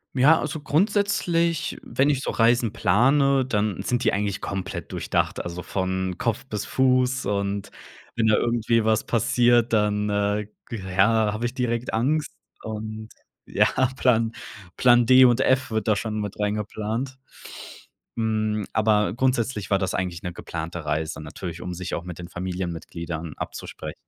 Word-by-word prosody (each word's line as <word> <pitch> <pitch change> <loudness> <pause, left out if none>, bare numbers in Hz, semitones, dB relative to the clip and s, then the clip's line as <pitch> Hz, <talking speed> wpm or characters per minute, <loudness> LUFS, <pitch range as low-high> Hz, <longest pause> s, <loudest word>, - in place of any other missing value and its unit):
Ja, 150 +5 +5
also, 150 +1 -3
grundsätzlich, 170 -1 +1
wenn 140 +2 +1
ich 140 -3 +1
so - - -2
Reisen 115 -1 +2
plane, 135 +7 +3
dann 105 -5 -1
sind 120 +4 -1
die - - +3
eigentlich 100 -1 -2
komplett 95 0 -5
durchdacht, - - -1
also 85 +1 -6
von 95 -1 -2
Kopf 115 +2 -1
bis 105 -4 -4
Fuß. 130 0 +2
Und 100 -1 -2 0.5
wenn 110 -1 +2
da 110 - +5
irgendwie 115 -1 +1
was 110 0 +1
passiert, 120 0 +3
dann, 105 -1 +1
äh, 105 0 0 0.2
ja, 105 +1 +2
habe 110 +3 -3
ich 120 - -2
direkt 125 -2 -2
Angst. 145 +7 0 0.3
Und 110 0 -6 0.4
ja, - - +2 0.3
Plan 115 -3 +2 0.4
Plan 120 -1 +5
D 130 +2 +7
und 120 0 +5
F 130 -2 +2
wird 110 0 -1
da 105 - +4
schon 110 +1 -3
mit 105 -1 -4
reingeplant. 110 +5 -3 1.0
Hm, 110 -2 0
aber 105 -3 +2
grundsätzlich 120 -5 0
war 100 - +3
das 95 -2 -1
eigentlich 90 -2 -2
'ne 90 -1 -4
geplante 80 0 -6
Reise 80 +1 -2
natürlich, 85 +3 -7
um 90 - -5
sich 90 +1 -4
auch 85 - -5
mit 90 -1 -8
den 85 - -7
Familienmitgliedern 85 -3 -5
abzuspre - - -6
110 Hz, 150 wpm, -24 LUFS, 95-125 Hz, 1.0 s, D